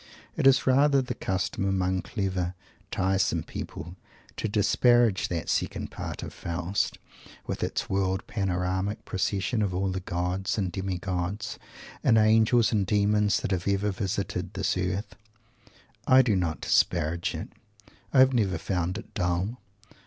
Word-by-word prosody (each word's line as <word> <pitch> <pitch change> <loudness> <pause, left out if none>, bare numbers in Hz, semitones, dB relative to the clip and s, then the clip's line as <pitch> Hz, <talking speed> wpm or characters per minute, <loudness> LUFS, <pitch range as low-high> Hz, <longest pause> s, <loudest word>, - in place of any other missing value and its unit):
It - - +3
is 135 0 +5
rather 140 +2 +4
the 125 -1 -2
custom 95 -3 -2
among 95 -1 +1
clever, 95 -3 -2 0.3
tiresome 95 +1 +1
people 85 +4 -7 0.4
to - - -2
disparage 110 +1 +3
that 85 -2 -3
second - - -1
part - - -6
of - - -7
Faust, 90 +3 -2 0.5
with - - -4
its - - -2
world 95 0 0
panoramic 95 +1 -2
procession 100 +4 -1
of 95 -3 0
all 95 +1 0
the 95 - -2
gods 90 +2 -2
and 95 -4 -1
demi 95 0 -3
gods 95 +4 -3 0.4
and 115 - +5
angels 110 +2 +4
and 105 -3 +2
demons 105 +1 +2
that - - -3
have 90 -1 -1
ever 100 +1 +1
visited 95 0 -3
this - - 0
earth. 95 +3 -2 0.9
I 130 0 +7
do 110 -5 +2
not 85 -4 -1
disparage 85 +2 +1
it. - - -6 0.6
I 130 - +6
have 130 0 +5
never 100 -7 +1
found 90 +1 -2
it - - -10
dull. 90 +7 -1
95 Hz, 145 wpm, -27 LUFS, 90-110 Hz, 0.9 s, I